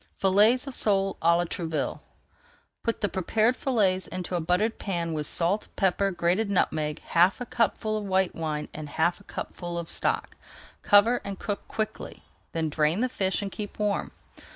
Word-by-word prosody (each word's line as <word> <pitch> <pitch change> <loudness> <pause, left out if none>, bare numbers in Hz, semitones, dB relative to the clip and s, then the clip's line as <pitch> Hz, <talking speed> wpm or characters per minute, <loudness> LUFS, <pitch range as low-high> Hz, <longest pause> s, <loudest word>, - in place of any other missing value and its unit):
FILLETS 210 +7 +4
OF 275 -3 -7
SOLE 195 -2 +2
À 170 +1 +5
LA 175 - +1
TROUVILLE 165 -2 -3 0.8
Put 230 - -1
the 205 - +2
prepared 215 +6 +1
fillets 200 -9 +1
into 185 0 -5
a - - +1
buttered 180 +7 0
pan 170 -4 -2
with 150 -2 -2
salt, 180 +5 +2
pepper, 195 0 +2
grated 180 +4 0
nutmeg, 155 -6 0
half 175 +3 +3
a 245 - -4
cupful 220 -2 0
of 210 - -6
white 190 -1 +1
wine, 155 -2 -3
and 150 -1 -7
half 170 +5 +1
a - - -17
cupful 175 -3 -6
of 170 -1 -5
stock. - - -1 0.5
Cover 220 +4 +5
and 200 -1 -5
cook 205 +1 -4
quickly, 215 -1 -4 0.3
then 165 -1 -1
drain 155 +5 +1
the 255 - +1
fish 190 -2 -1
and 195 - -4
keep 205 +1 -7
warm. 210 -1 -1
190 Hz, 175 wpm, -27 LUFS, 170-210 Hz, 0.8 s, À